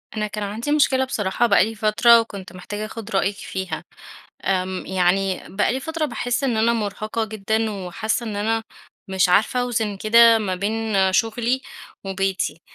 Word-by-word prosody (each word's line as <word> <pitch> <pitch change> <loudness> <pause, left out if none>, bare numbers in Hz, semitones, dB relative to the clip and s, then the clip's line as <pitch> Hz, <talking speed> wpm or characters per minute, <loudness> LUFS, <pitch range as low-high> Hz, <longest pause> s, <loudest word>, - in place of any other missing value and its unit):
أنا 210 0 -1
كان 210 0 -5
عندي 225 +8 -3
مشكلة 265 -3 +3
بصراحة 230 -1 0
بقى 200 -1 +5
لي 225 - -6
فترة 225 +2 +5
وكنت 200 -5 -6
محتاجة 205 +4 -6
أخد 225 0 -8
رأيِك 195 +1 +1
فيها. 190 -5 -5 0.6
آمم، 185 -1 -1
يعني 190 +1 +1
بقى 205 +2 0
لي 260 - -2
فترة 320 +2 -3
باحس 245 0 -2
إن 245 -4 +1
أنا 225 +2 +3
مرهقة 215 0 -2
جدًا 220 +1 -1
وحاسة 210 +4 -3
إن 210 -2 -4
أنا 225 +2 0 0.5
مش 190 -1 +2
عارفة 215 +7 +3
أوزن 225 -4 -1
كده 230 +3 +6
ما 200 -4 -2
بين 200 -1 0
شغلي 230 +5 +1 0.4
وبيتي. 195 -3 -2
215 Hz, 160 wpm, -22 LUFS, 195-230 Hz, 0.6 s, كده